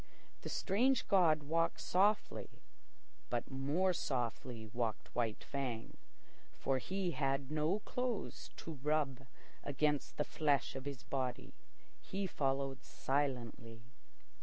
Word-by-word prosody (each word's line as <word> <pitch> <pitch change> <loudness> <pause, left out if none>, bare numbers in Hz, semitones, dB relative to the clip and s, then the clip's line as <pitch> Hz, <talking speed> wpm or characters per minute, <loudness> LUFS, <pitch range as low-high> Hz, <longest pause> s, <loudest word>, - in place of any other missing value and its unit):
The - - -5
strange 240 +6 +2
god 165 -6 +5
walked 165 +3 +1
softly, 205 +4 +2 0.8
but 120 +2 -1
more 145 +8 +2
softly 120 -5 -2
walked 115 -1 -2
White 115 -3 0
Fang, 130 -5 -3 0.6
for 135 -1 +1
he 190 +5 -1
had 135 -1 0
no 155 +7 +2
clothes 250 -3 -2
to 160 -4 -7
rub 140 -3 +1 0.4
against 145 0 +1
the 150 - +3
flesh 145 -4 +1
of 135 0 -5
his 140 -3 -5
body. 130 -2 -2 0.5
He 195 +1 -2
followed 135 -5 0
silently. 120 -5 -2
140 Hz, 110 wpm, -37 LUFS, 130-165 Hz, 0.8 s, god